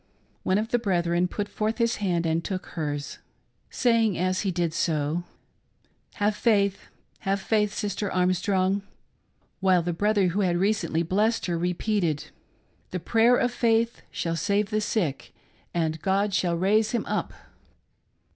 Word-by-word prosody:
One 185 - +1
of 220 +2 -1
the 240 - +2
brethren 175 -4 +1
put 205 +3 -3
forth 215 +2 -2
his 235 0 +1
hand, 175 -4 0
and 165 +1 0
took 185 -2 -4
hers, 145 -3 -4 0.5
saying 230 -5 +2
as 185 +1 0
he 200 - -1
did 170 -3 -1
so: 160 +1 0 0.4
" - - -40
Have 205 0 +1
faith; 200 -4 +1 0.3
have 195 +1 -1
faith 210 +1 +1
Sister 205 -1 -3
Arm 180 0 +2
strong; 190 +1 +1 0.3
" - - -44
— - - -41
while 185 -2 +3
the 175 +1 -1
brother 200 +1 +2
who 185 +4 -1
had 175 -3 +2
recently 180 -4 +1
blessed 210 +7 +1
her 175 - -1
repeated: 180 -2 -1 0.3
" - - -39
The 180 - -3
prayer 230 +7 +4
of 245 - +1
faith 230 -1 +1
shall 165 -1 -2
save 205 +4 0
the 215 0 +1
sick, 180 -10 -2 0.4
and 160 -2 -1
God 200 +1 +1
shall 175 -3 +1
raise 210 +5 +2
him 235 - 0
up - - -2
190 Hz, 165 wpm, -26 LUFS, 175-215 Hz, 0.5 s, prayer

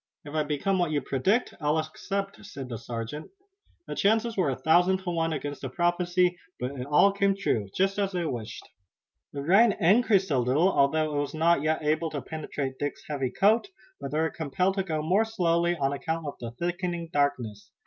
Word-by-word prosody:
"If 145 - -9
I 155 - +1
become 155 +6 0
what 175 -2 +1
you 150 -1 +1
predict 185 - 0
I'll 150 +1 +2
accept," 195 +6 -4
said 140 -11 -8
the 115 - -5
sergeant. 115 +5 -6 0.6
The - - -5
chances 225 +3 +1
were 180 -7 +1
a 135 - -1
thousand 175 +7 +3
to 180 - -2
one 165 -1 0
against 145 -1 -4
the 135 - -4
prophecy, 175 +3 +1 0.2
but 125 +2 -2
it 130 -2 -6
all 150 +7 +5
came 200 0 +1
true, 110 - 0
just 195 +2 +1
as 200 -1 0
they 175 -2 -2
wished. 120 -7 -5 0.6
The 140 -1 -5
rain 200 +7 +5
increased 195 0 +3
a 135 - +3
little, 140 +10 +3
although 155 +1 +2
it - - +1
was 145 +1 -3
not 165 -1 +3
yet 155 +1 0
able 155 +2 +1
to 145 -3 -4
penetrate 145 -4 -5
Dick's 145 0 -3
heavy 140 -4 -2
coat, 215 - +3 0.3
but 140 - -5
they 150 - -2
were 160 0 +1
compelled 175 +5 0
to 195 - +1
go 155 -4 -2
more 185 +7 +3
slowly 175 -5 +1
on 135 -1 0
account 160 +3 -3
of 145 - -4
the 120 - -5
thickening 175 +5 -3
darkness. 130 -8 -1
160 Hz, 200 wpm, -27 LUFS, 140-185 Hz, 0.6 s, all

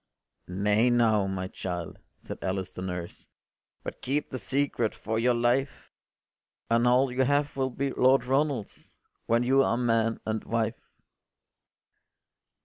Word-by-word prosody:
” - - -49
“Nay 105 +6 +2
now, 110 -4 +3
my 95 -1 -3
child,” 90 -3 -6 0.2
said - - -8
Alice 95 0 -3
the - - -7
nurse, 90 -2 -6 0.6
“But - - -7
keep 145 +3 -2
the 130 - -4
secret 130 0 -1
for 110 +1 -2
your 120 +1 +3
life, 120 +3 0 0.8
And 115 +1 +4
all 125 +2 +4
you 125 +1 0
have 145 +2 +1
will 135 -1 0
be 135 +2 -2
Lord 130 0 +3
Ronald’s, 135 -4 -2 0.2
When 115 +1 +3
you 135 +2 +4
are 120 - +1
man 115 -2 +1
and 110 0 -2
wife. 115 0 -2
120 Hz, 140 wpm, -28 LUFS, 105-130 Hz, 0.8 s, And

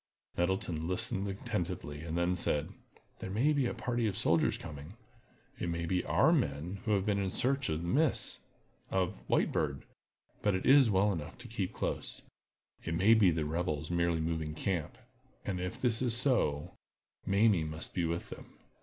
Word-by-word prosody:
Nettleton 90 -3 -1
listened 95 +2 -1
attentively, 90 - -4
and 80 +1 -4
then 85 +1 +1
said: 75 -4 0 0.5
"There 95 +2 -5
is 145 +2 +3
a - - -5
party 120 -2 -1
of 100 -2 -2
soldiers 85 -7 +2
coming. 75 +6 -9 0.6
It 85 - -2
may 85 0 -2
be 90 +2 0
our - - +4
men 75 +7 -1
who 110 - +2
have 95 -1 0
been 105 -1 +1
in 95 -1 0
search 135 +6 0
of 80 +2 -2
Miss—— 135 - +1 0.5
of 95 -7 0
the - - -19
White - - +2
Bird; - - -1 0.6
but, 105 -2 +2
it 95 - -2
is 135 -3 +7
well 100 +1 +3
enough 80 -4 -6
to - - -9
keep - - -3
close. - - -3 0.6
It 80 - -2
may 100 +7 +5
be 110 -5 +6
the 80 -2 0
rebels 80 -1 -2
merely 85 -1 +1
moving 80 -1 -2
camp. 85 -3 -2 0.5
And 95 -3 -2
if 90 0 -4
this 120 -2 +1
is 120 -3 +3
so, 120 - +2 0.5
Mamie 100 -3 +4
must 80 +1 -6
be 90 - 0
with 85 +1 -2
them. - - -11
90 Hz, 175 wpm, -32 LUFS, 80-105 Hz, 0.6 s, is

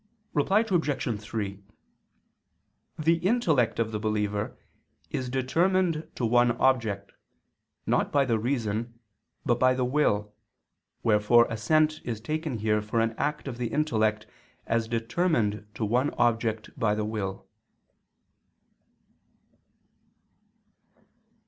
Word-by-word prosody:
Reply 190 +8 +3
Obj. 145 - 0
3: 100 -3 -5 1.3
The 165 +2 +2
intellect 170 - +2
of 115 -1 0
the 105 - -3
believer 105 -1 -2 0.5
is 130 -3 -3
determined 165 +6 +1
to 120 - -1
one 120 +1 +4
object, 115 -6 +1 0.7
not - - +1
by 140 -1 +3
the 115 -3 +1
reason, 115 -1 -2 0.5
but 120 0 +2
by 130 0 +4
the 130 -1 0
will, 105 -7 +1 0.7
wherefore 110 +2 +5
assent 155 +7 +2
is 115 -3 -4
taken 155 +2 -3
here 105 0 +1
for 105 +2 -1
an 115 0 +1
act 150 +2 -2
of 125 -2 -6
the 120 - -1
intellect 110 -7 0 0.4
as 115 0 0
determined 115 - 0
to 110 - -1
one 125 +6 +2
object 115 -2 0
by 110 -4 +2
the 105 0 -1
will. 100 -3 -4
120 Hz, 110 wpm, -27 LUFS, 110-145 Hz, 1.3 s, wherefore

